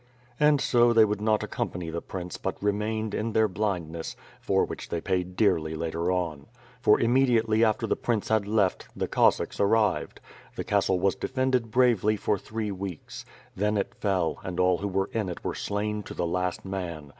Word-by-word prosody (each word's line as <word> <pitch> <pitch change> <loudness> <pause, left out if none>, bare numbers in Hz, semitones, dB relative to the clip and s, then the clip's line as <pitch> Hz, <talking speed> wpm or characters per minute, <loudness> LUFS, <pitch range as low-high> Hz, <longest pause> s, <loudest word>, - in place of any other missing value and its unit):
And 150 -1 +5
so 120 -2 +4
they 115 -1 +7
would 105 -1 -2
not 110 0 +2
accompany 85 -2 -4
the 85 +1 -3
prince 90 -2 -6
but - - -3
remained, 105 +1 -1
in 110 +1 -2
their 110 0 +4
blindness, 90 -5 -3 0.2
for - - +1
which - - -7
they 85 - -2
paid 90 0 -2
dearly 85 -7 +2
later 85 +2 -1
on; 85 -6 -2 0.3
for 105 - +5
immediately 115 -3 +3
after 110 -2 +2
the - - +1
prince 115 -4 -1
had 110 -2 +2
left, 105 -3 +1
the - - -2
Cossacks - - +2
arrived. 105 -1 +1 0.4
The - - -3
castle 95 -1 +1
was 95 +1 +2
defended 130 -3 -1
bravely 110 -3 +3
for 100 0 0
throe 110 +1 -4
weeks. 95 -4 -7 0.3
Then 105 +2 0
it 100 - -2
fell 95 -5 -1
and 90 -1 -4
all 90 -1 +3
who 100 - -2
were 95 0 -1
in 110 -4 -1
it 90 - -7
were - - -2
slain 105 +1 -2
to - - -9
the 85 - -1
last 90 +2 -2
man. 85 -6 -5
100 Hz, 185 wpm, -27 LUFS, 90-110 Hz, 0.4 s, they